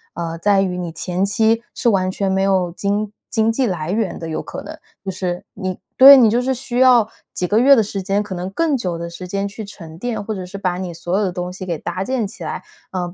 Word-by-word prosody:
呃， 165 Hz, -1 st, -4 dB
在 200 Hz, +2 st, +3 dB
于 185 Hz, -2 st, -1 dB
你 175 Hz, -2 st, -4 dB
前 175 Hz, +3 st, -1 dB
期 225 Hz, +3 st, +2 dB
是 240 Hz, -, -2 dB
完 185 Hz, -3 st, +1 dB
全 195 Hz, +1 st, -1 dB
没 190 Hz, 0 st, +1 dB
有 190 Hz, -3 st, +2 dB
经 205 Hz, +2 st, -2 dB, 0.2 s
经 220 Hz, -1 st, +2 dB
济 255 Hz, +2 st, +1 dB
来 175 Hz, -5 st, -2 dB
源 210 Hz, -2 st, -1 dB
的， 165 Hz, -, -6 dB
有 160 Hz, -, -3 dB
可 -, -, -7 dB
能 -, -, -8 dB, 0.3 s
就 195 Hz, -, -2 dB
是 180 Hz, -1 st, -4 dB
你 185 Hz, -1 st, -4 dB, 0.2 s
对， 275 Hz, +2 st, +11 dB
你 235 Hz, -4 st, +6 dB
就 235 Hz, +3 st, +2 dB
是 265 Hz, +1 st, 0 dB
需 250 Hz, -1 st, -3 dB
要 250 Hz, -4 st, +6 dB, 0.3 s
几 180 Hz, -, -1 dB
个 210 Hz, +5 st, +3 dB
月 275 Hz, +3 st, +7 dB
的 225 Hz, -, +4 dB
时 195 Hz, -1 st, -4 dB
间 200 Hz, +1 st, +1 dB
可 205 Hz, -2 st, -5 dB
能 180 Hz, +1 st, -4 dB
更 305 Hz, +9 st, +1 dB
久 180 Hz, -9 st, -2 dB
的 170 Hz, 0 st, -5 dB
时 180 Hz, +2 st, -8 dB
间 200 Hz, +2 st, -2 dB
去 205 Hz, +2 st, -7 dB
沉 165 Hz, -6 st, -11 dB
淀， 240 Hz, +4 st, -3 dB
或 215 Hz, +1 st, -4 dB
者 185 Hz, -2 st, -5 dB
是 190 Hz, +2 st, -8 dB
把 185 Hz, -2 st, -1 dB
你 180 Hz, -2 st, -4 dB
所 175 Hz, +3 st, -2 dB
有 210 Hz, -, +1 dB
的 185 Hz, -, 0 dB
东 180 Hz, +1 st, -4 dB
西 185 Hz, 0 st, -7 dB
给 170 Hz, -3 st, -2 dB
搭 175 Hz, +4 st, -4 dB
建 235 Hz, 0 st, -1 dB
起 -, -, -10 dB
来， -, -, -5 dB, 0.3 s
呃， 180 Hz, -2 st, -3 dB
195 Hz, 280 characters per minute, -20 LUFS, 180-220 Hz, 0.3 s, 对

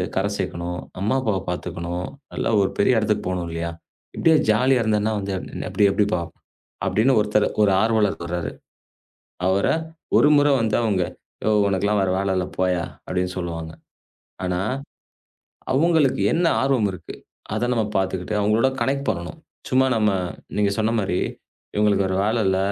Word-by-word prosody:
கரை 95 Hz, +1 st, +1 dB
சேக்கணும். 85 Hz, +1 st, -3 dB, 0.2 s
அம்மா 105 Hz, +6 st, +1 dB
அப்பாவ 110 Hz, -6 st, 0 dB
பாத்துக்கணும். 90 Hz, 0 st, -4 dB, 0.3 s
நல்லா -, -, -1 dB
ஒரு 95 Hz, -, +2 dB
பெரிய 115 Hz, +4 st, +3 dB
எடத்துக்குப் 105 Hz, -2 st, 0 dB
போணும் 90 Hz, -2 st, -2 dB
இல்லயா? 85 Hz, 0 st, -3 dB, 0.4 s
இப்படியே 160 Hz, -1 st, +4 dB
ஜாலியா 125 Hz, +4 st, +3 dB
இருந்தனா 110 Hz, 0 st, +1 dB
வந்து 100 Hz, 0 st, -4 dB, 0.4 s
எப்படி 105 Hz, -, +2 dB
எப்படிப்பா? 100 Hz, -3 st, +1 dB, 0.6 s
அப்படின்னு 110 Hz, +8 st, +3 dB
ஒருத்தர், 105 Hz, 0 st, +2 dB, 0.2 s
ஒரு 100 Hz, -, +4 dB
ஆர்வலர் 110 Hz, -3 st, +2 dB
சொல்றாரு. 85 Hz, 0 st, -3 dB, 1.0 s
அவர 95 Hz, +1 st, +2 dB, 0.5 s
ஒரு -, -, +6 dB
முறை 145 Hz, 0 st, +4 dB
வந்து, 110 Hz, -2 st, +1 dB
அவங்க 100 Hz, -5 st, +1 dB, 0.4 s
யோவ்! 105 Hz, -1 st, +3 dB
உனக்கு 95 Hz, 0 st, 0 dB
எல்லாம் 105 Hz, 0 st, +2 dB
வேற 95 Hz, -, +1 dB
வேலை 100 Hz, 0 st, 0 dB
இல்ல 90 Hz, -, 0 dB
போயா! 90 Hz, -2 st, +1 dB, 0.2 s
அப்படின்னு 90 Hz, 0 st, -1 dB
சொல்லுவாங்க. 85 Hz, -2 st, -4 dB, 0.7 s
ஆனா 90 Hz, -1 st, -1 dB, 1.1 s
அவங்களுக்கு 160 Hz, -1 st, +3 dB
என்ன 170 Hz, +2 st, +2 dB, 0.2 s
ஆர்வம் 130 Hz, -6 st, +2 dB
இருக்கு? 90 Hz, -, -9 dB, 0.4 s
அத 120 Hz, +3 st, 0 dB
நாம 115 Hz, -, +1 dB
பாத்துகிட்டு 95 Hz, +1 st, -2 dB
அவங்களோட 110 Hz, +5 st, +3 dB
கனெக்ட் 140 Hz, +3 st, 0 dB
பண்ணனும். 85 Hz, -6 st, -4 dB, 0.3 s
சும்மா, 130 Hz, +1 st, +4 dB
நம்ம 105 Hz, -1 st, +3 dB, 0.5 s
நீங்க 105 Hz, -1 st, +2 dB
சொன்ன 110 Hz, +1 st, +1 dB
மாரி 95 Hz, -3 st, 0 dB, 0.6 s
இவங்களுக்கு 105 Hz, -2 st, +3 dB
வேற 95 Hz, -, -1 dB
வேலை 110 Hz, +2 st, +1 dB
இல்ல! 95 Hz, 0 st, +2 dB
100 Hz, 150 wpm, -23 LUFS, 90-110 Hz, 1.1 s, ஒரு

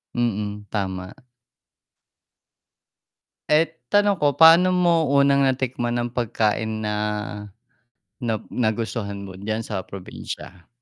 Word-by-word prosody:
Mm, 105 Hz, -3 st, -2 dB
tama. 95 Hz, -2 st, -3 dB, 2.3 s
Eh, 155 Hz, +2 st, +3 dB, 0.2 s
tanong 205 Hz, -2 st, +4 dB
ko, 145 Hz, -1 st, +2 dB
paano 170 Hz, +3 st, +7 dB
mo 170 Hz, -3 st, +3 dB
unang 140 Hz, 0 st, +4 dB
natikman 125 Hz, -2 st, -1 dB
ng 120 Hz, 0 st, -1 dB
pagkain 110 Hz, -2 st, -1 dB
na 105 Hz, 0 st, -1 dB, 1.3 s
na 115 Hz, -2 st, -1 dB, 0.2 s
nagustuhan 110 Hz, -3 st, -2 dB
mo 95 Hz, -, -8 dB
diyan 110 Hz, +3 st, -3 dB
sa 100 Hz, -4 st, -3 dB
probinsya? 95 Hz, -1 st, -9 dB
115 Hz, 100 wpm, -23 LUFS, 105-140 Hz, 2.3 s, paano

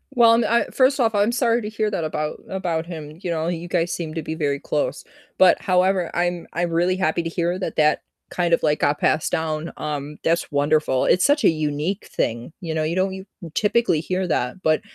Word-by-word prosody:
Well, 230 Hz, -1 st, +6 dB
and 230 Hz, 0 st, +3 dB
I 235 Hz, +1 st, +2 dB
first 270 Hz, +2 st, +2 dB
off, 225 Hz, -3 st, +2 dB
I'm 205 Hz, +2 st, +2 dB
sorry 240 Hz, -1 st, +2 dB
to 210 Hz, -, -4 dB
hear 215 Hz, -1 st, -1 dB
that 175 Hz, -, -2 dB
about 155 Hz, -1 st, -3 dB
about 175 Hz, -4 st, -2 dB
him, 155 Hz, -2 st, -8 dB
you 180 Hz, -, -4 dB
know, 160 Hz, -1 st, -1 dB
you 175 Hz, 0 st, -3 dB
guys 175 Hz, 0 st, 0 dB
seem 160 Hz, -3 st, -4 dB
to 165 Hz, -, -3 dB
be 160 Hz, -, -4 dB
very 145 Hz, -3 st, -1 dB
close, -, -, -2 dB, 0.3 s
but 185 Hz, -, +5 dB
however, 185 Hz, -1 st, +2 dB
I'm 175 Hz, -1 st, -1 dB
I'm 175 Hz, +1 st, -1 dB
really 175 Hz, +2 st, +2 dB
happy 170 Hz, -2 st, 0 dB
to 165 Hz, -, -3 dB
hear 175 Hz, +1 st, -1 dB
that 185 Hz, -, -4 dB
that 150 Hz, 0 st, +3 dB, 0.3 s
kind 175 Hz, -1 st, 0 dB
of, -, -, +3 dB
like, 150 Hz, -1 st, +1 dB
got 145 Hz, 0 st, +2 dB
passed 155 Hz, -, +1 dB
down, 160 Hz, -1 st, -2 dB
um, 150 Hz, 0 st, -4 dB
that's 165 Hz, +1 st, 0 dB
wonderful, 145 Hz, -2 st, +2 dB
it's 180 Hz, -, +3 dB
such 290 Hz, +1 st, +3 dB
a -, -, +8 dB
unique 155 Hz, +4 st, -2 dB
thing, 115 Hz, +6 st, -2 dB
you 165 Hz, -4 st, -4 dB
know, 155 Hz, -, 0 dB
you 155 Hz, +2 st, -1 dB
don't 190 Hz, +1 st, +1 dB
u 190 Hz, 0 st, -8 dB, 0.3 s
typically 210 Hz, -6 st, +2 dB
hear 185 Hz, +2 st, -2 dB
that, 140 Hz, +4 st, -1 dB
but, 155 Hz, 0 st, +2 dB
170 Hz, 220 wpm, -22 LUFS, 155-190 Hz, 0.3 s, a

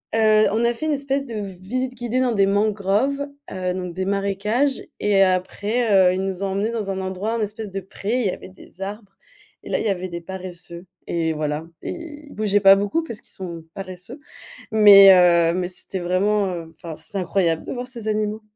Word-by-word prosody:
Heu, 215 Hz, -1 st, +5 dB
on 225 Hz, +3 st, +1 dB
a 235 Hz, -, +2 dB
fait 310 Hz, +7 st, -4 dB
une 305 Hz, -, +1 dB
espèce 275 Hz, 0 st, -1 dB
de 235 Hz, -4 st, -7 dB
v 200 Hz, -3 st, -5 dB
visite 255 Hz, +6 st, -3 dB
guidée 245 Hz, 0 st, -2 dB
dans 255 Hz, -1 st, +2 dB
des 195 Hz, -2 st, +3 dB
mangroves, 210 Hz, +7 st, +1 dB, 0.2 s
heu, 185 Hz, -1 st, -2 dB
donc 180 Hz, -2 st, -5 dB
des 185 Hz, +2 st, -3 dB
marécages 200 Hz, +7 st, 0 dB, 0.2 s
et 200 Hz, -2 st, +3 dB
après, 195 Hz, +1 st, +2 dB
heu, -, -, -1 dB
ils 190 Hz, -, -2 dB
nous 190 Hz, -1 st, -4 dB
ont 195 Hz, -, 0 dB
emmenés 200 Hz, +4 st, -1 dB
dans 215 Hz, -4 st, -3 dB
un 190 Hz, -1 st, -2 dB
endroit, 190 Hz, +4 st, -3 dB
un 230 Hz, -, -1 dB
espèce 215 Hz, 0 st, -4 dB
de 195 Hz, +1 st, -4 dB
pré, 205 Hz, +6 st, -3 dB
il -, -, -1 dB
y -, -, +1 dB
avait -, -, -9 dB
des 185 Hz, 0 st, -17 dB
arbres 200 Hz, 0 st, -7 dB, 0.5 s
et -, -, -11 dB
là, -, -, +1 dB
il -, -, -3 dB
y -, -, +2 dB
avait 185 Hz, -1 st, -2 dB
des 170 Hz, 0 st, -6 dB
paresseux 180 Hz, -1 st, -9 dB, 0.2 s
et 165 Hz, -1 st, -1 dB
voilà 150 Hz, +1 st, -3 dB, 0.2 s
et -, -, -3 dB
ils 300 Hz, -3 st, -9 dB
bougeaient 205 Hz, -1 st, +1 dB
pas 195 Hz, -1 st, +8 dB
beaucoup 205 Hz, +12 st, 0 dB
parce 235 Hz, -9 st, -8 dB
qu'ils -, -, -19 dB
sont 170 Hz, -3 st, -7 dB
paresseux, 195 Hz, +7 st, -8 dB, 0.5 s
mais 200 Hz, -2 st, +9 dB
heu, 170 Hz, -2 st, +5 dB
mais 180 Hz, -1 st, -1 dB
c'était 185 Hz, +1 st, -6 dB
vraiment, 190 Hz, +2 st, +1 dB
heu 165 Hz, -2 st, -6 dB
enfin 165 Hz, -2 st, -8 dB
c'était 160 Hz, +5 st, -9 dB
incroyable 175 Hz, -3 st, 0 dB
de -, -, -5 dB
voir 250 Hz, -1 st, -5 dB
ces 235 Hz, -4 st, -9 dB
animaux.. 215 Hz, 0 st, -1 dB
195 Hz, 215 wpm, -22 LUFS, 185-220 Hz, 0.5 s, mais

